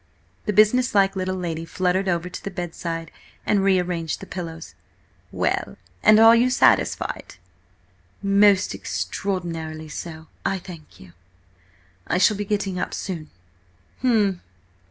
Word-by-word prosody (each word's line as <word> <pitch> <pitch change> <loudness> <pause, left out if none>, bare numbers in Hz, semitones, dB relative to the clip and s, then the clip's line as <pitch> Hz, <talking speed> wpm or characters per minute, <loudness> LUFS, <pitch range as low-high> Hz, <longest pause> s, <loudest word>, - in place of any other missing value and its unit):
The - - +2
business 215 +4 +4
like 195 -1 +4
little 185 0 -2
lady 165 -3 -3
fluttered 185 +3 0
over 175 0 0
to 180 - -8
the - - -3
bedside 165 -2 -5 0.3
and 200 -2 +2
rearranged 180 -4 0
the - - -9
pillows. 165 -4 -7 0.6
"Well, 65 - -1 0.2
and 215 - +7
are 225 +1 +8
you 240 +2 +3
satisfied?" 255 - +1 0.9
"Madam, 200 0 +2
most 205 -2 +5
extraordinarily 165 -5 -4
so, 160 +1 -7 0.2
I 195 - 0
thank 170 -4 -12
you. 90 -2 -15 0.9
I - - +1
shall 210 +3 +4
be 205 +1 -3
getting 200 -3 -1
up - - -3
soon." 165 -5 -5 0.7
"H'm!" 210 -7 +2
185 Hz, 135 wpm, -23 LUFS, 165-200 Hz, 0.9 s, are